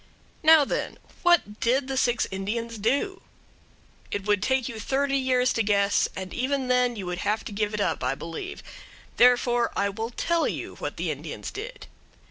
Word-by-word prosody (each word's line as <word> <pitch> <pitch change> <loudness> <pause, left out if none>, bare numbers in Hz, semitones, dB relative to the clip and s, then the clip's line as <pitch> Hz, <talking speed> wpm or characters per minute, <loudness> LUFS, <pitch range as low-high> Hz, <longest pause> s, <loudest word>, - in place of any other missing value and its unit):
Now, 315 -2 +7
then, - - -3 0.2
what 345 - +3
did 260 +3 +1
the 270 - -2
six 245 -2 +2
Indians 220 +4 -3
do? 280 - 0 0.9
It 205 -1 -3
would 205 -2 +2
take 260 +1 +1
you 230 -4 -6
thirty 275 +5 0
years 255 -1 +2
to 225 - +1
guess, 200 -1 +2
and 190 -1 -6
even 265 0 -1
then 250 -1 +3
you 200 -4 -5
would 180 0 -3
have 210 +3 0
to - - -6
give 210 +1 -1
it 210 - -1
up, - - -1
I - - 0
believe. 165 - -7 0.5
Therefore, 240 -1 +4
I 200 - +1
will 220 +3 -4
tell 335 +7 0
you - - -4
what - - -5
the - - -1
Indians - - -6
did. 460 +5 -7
240 Hz, 180 wpm, -26 LUFS, 205-270 Hz, 0.9 s, Now